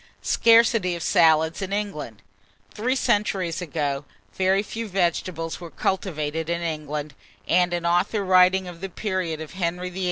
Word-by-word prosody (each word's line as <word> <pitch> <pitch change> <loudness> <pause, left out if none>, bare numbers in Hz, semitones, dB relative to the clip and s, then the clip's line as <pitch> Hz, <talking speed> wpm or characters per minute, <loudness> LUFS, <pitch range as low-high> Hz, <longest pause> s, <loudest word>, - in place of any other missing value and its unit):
SCARCITY 230 -5 +4
OF 170 - -6
SALADS 160 -1 +3
IN 195 0 -4
ENGLAND. 195 - -4 0.5
Three 250 +5 0
centuries 205 -9 0
ago, 145 -4 -2 0.3
very 190 +1 +2
few 225 +1 -5
vegetables 175 -3 -2
were 170 - -7
cultivated 160 -4 -2
in 170 0 -1
England, 150 -2 -4 0.3
and 180 0 +3
an 175 -1 -2
author 175 +4 +1
writing 185 0 +4
of 175 -1 -10
the 195 - -4
period 185 -5 -3
of 160 -1 -8
Henry 180 0 -2
VIII.' 185 - -7
180 Hz, 150 wpm, -24 LUFS, 160-195 Hz, 0.5 s, SCARCITY